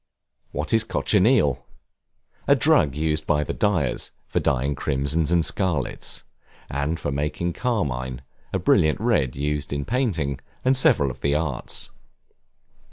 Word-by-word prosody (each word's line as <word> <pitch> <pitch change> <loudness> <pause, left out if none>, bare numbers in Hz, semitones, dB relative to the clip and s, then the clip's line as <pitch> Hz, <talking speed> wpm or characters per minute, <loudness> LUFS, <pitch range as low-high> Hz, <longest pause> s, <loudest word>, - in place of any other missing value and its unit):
What 75 +1 -3
is 110 -1 +4
Cochineal? 100 - +2 0.8
A - - +6
drug 70 -2 +3
used 75 0 0
by 75 0 +2
the - - -4
dyers, 95 - 0 0.2
for - - 0
dyeing 70 +1 +1
crimsons 70 +4 -1
and 85 -2 +3
scarlets; 70 -8 -1 0.5
and 70 +4 -1
for 70 - -2
making 75 +5 -2
carmine, 65 - -2 0.3
a - - 0
brilliant 80 -1 +3
red 105 - +1
used 75 +1 -2
in 70 -1 -2
painting, 90 - -1 0.3
and 130 +1 +4
several 75 - +3
of 65 +2 -13
the 70 +1 +1
arts. 75 -5 -2
75 Hz, 135 wpm, -24 LUFS, 70-90 Hz, 0.8 s, A